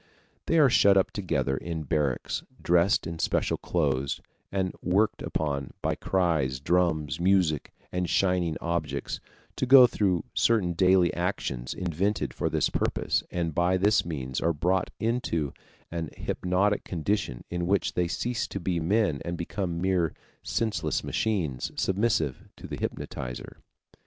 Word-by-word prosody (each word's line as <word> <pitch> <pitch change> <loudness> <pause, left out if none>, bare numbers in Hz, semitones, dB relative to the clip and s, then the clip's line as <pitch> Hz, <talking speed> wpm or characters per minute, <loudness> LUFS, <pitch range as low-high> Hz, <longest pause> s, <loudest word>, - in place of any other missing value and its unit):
They 165 - +3
are 150 -3 +7
shut 100 -5 +5
up 95 - +2
together 90 -8 -1
in 80 +2 -4
barracks, 70 -2 -1 0.2
dressed 90 +3 +3
in 80 0 -5
special - - +1
clothes, 70 -5 0 0.3
and 95 -2 -1
worked 100 +4 +1
upon 70 -3 -2
by - - +1
cries, 80 -9 0
drums, 80 -1 +1
music, 90 -5 +2 0.2
and 90 -1 -1
shining 90 -4 +1
objects 85 -2 -2 0.4
to 130 - 0
go 130 -1 +10
through 95 -8 +1
certain 105 -7 +2
daily 90 0 +4
actions 85 -9 -2
invented 90 +3 -1
for - - -1
this - - +1
purpose, - - 0
and 85 -2 -2
by 90 +3 +2
this 105 +4 +3
means 65 -6 -4
are 85 +1 +2
brought 90 +4 0
into 110 - -1 0.4
an 85 -2 -3
hypnotic 95 +3 0
condition 85 - -2
in 85 0 -2
which 100 +1 +1
they 90 -1 +1
cease 120 +6 -2
to 100 - -5
be 90 -1 -1
men 90 -3 +1
and 85 0 -3
become 85 0 -3
mere 90 -3 +1 0.3
senseless 110 -2 -1
machines, 85 - -1
submissive 95 - 0
to - - -10
the - - -5
hypnotizer. 60 -1 -5
90 Hz, 140 wpm, -27 LUFS, 80-95 Hz, 0.4 s, go